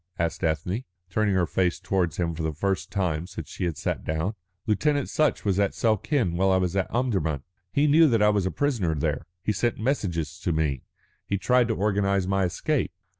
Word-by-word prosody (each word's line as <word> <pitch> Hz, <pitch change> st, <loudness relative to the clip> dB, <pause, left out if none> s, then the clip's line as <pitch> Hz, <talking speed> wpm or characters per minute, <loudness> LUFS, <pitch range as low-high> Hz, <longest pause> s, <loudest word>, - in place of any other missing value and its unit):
asked 85 Hz, +1 st, -2 dB
Ethne, 85 Hz, -, -1 dB, 0.3 s
turning 105 Hz, 0 st, +2 dB
her 90 Hz, -2 st, +3 dB
face 90 Hz, +1 st, 0 dB
towards 90 Hz, -4 st, 0 dB
him 85 Hz, -2 st, 0 dB
for 80 Hz, -, -5 dB
the 80 Hz, -1 st, -2 dB
first 95 Hz, +4 st, -1 dB
time 90 Hz, -4 st, -1 dB
since 85 Hz, -5 st, -7 dB
she -, -, -4 dB
had 85 Hz, -4 st, -2 dB
sat -, -, -2 dB
down. 80 Hz, +6 st, -1 dB, 0.3 s
"Lieutenant 145 Hz, +6 st, +1 dB
Sutch 155 Hz, -6 st, +1 dB
was 100 Hz, -1 st, +2 dB
at 100 Hz, -1 st, +1 dB
Suakin 110 Hz, -, +1 dB
while 95 Hz, +1 st, +3 dB
I 95 Hz, -, +4 dB
was 90 Hz, 0 st, 0 dB
at 95 Hz, -1 st, 0 dB
Omdurman. 95 Hz, -, 0 dB, 0.3 s
He 145 Hz, -, +2 dB
knew 155 Hz, +2 st, +6 dB
that 115 Hz, -3 st, +3 dB
I 105 Hz, -, +6 dB
was 100 Hz, -3 st, +1 dB
a -, -, -1 dB
prisoner 115 Hz, -, 0 dB
there. 75 Hz, +1 st, -2 dB, 0.2 s
He -, -, +1 dB
sent 110 Hz, +4 st, 0 dB
messages 95 Hz, -, -1 dB
to -, -, -1 dB
me, 75 Hz, -5 st, 0 dB, 0.5 s
he 100 Hz, -, 0 dB
tried 125 Hz, +4 st, +3 dB
to 110 Hz, -, 0 dB
organise 100 Hz, -1 st, +1 dB
my 95 Hz, 0 st, +1 dB
escape." 125 Hz, -, -1 dB
95 Hz, 205 wpm, -26 LUFS, 85-110 Hz, 0.5 s, knew